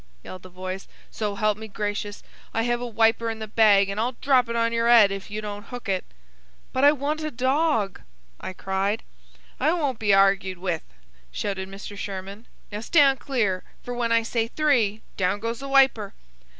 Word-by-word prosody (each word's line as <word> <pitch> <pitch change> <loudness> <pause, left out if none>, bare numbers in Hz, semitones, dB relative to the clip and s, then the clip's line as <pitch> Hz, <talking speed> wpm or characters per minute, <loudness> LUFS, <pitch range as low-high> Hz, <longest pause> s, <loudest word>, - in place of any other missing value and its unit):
yelled 185 - -9
the 185 - -12
voice. 185 +1 -6 0.2
"So 210 -2 -3
help 215 0 +1
me 220 - -7
gracious, 205 0 -4 0.3
I 225 - +2
have 240 0 0
a 245 - -3
wiper 230 0 +2
in 225 - -4
the 220 - -5
bag, 205 -2 +5
an' 200 +2 -3
I'll 240 +3 0
drop 255 -1 +2
it 235 - -2
on 230 0 +1
your 230 0 +1
'ead 225 -4 +7
if 195 +1 -6
you 210 +1 -4
don't 205 0 -6
hook 245 -2 -8
it." 190 -2 0 0.7
"But 260 - 0
I 290 - +8
want 300 +2 -2
a 310 - -2
dog," 260 - 0 0.4
I - - -5
cried. 195 +3 -1 0.6
"I 300 +4 +3
won't 285 -9 -1
be 210 -3 +2
argued 195 -1 +3
with!" 175 -3 -2 0.5
shouted 190 - -3
Mr. 200 +1 -8
Sherman. 200 +2 -7 0.2
"Now 205 - -4
stand 275 +3 +4
clear, 210 -9 -1 0.2
for 245 - -5
when 240 -1 -1
I 230 0 +4
say 230 0 -1
'three,' 235 -7 +1
down 190 +1 +1
goes 230 +2 -3
the 275 - -6
wiper." 265 -7 +3
220 Hz, 190 wpm, -25 LUFS, 195-245 Hz, 0.7 s, I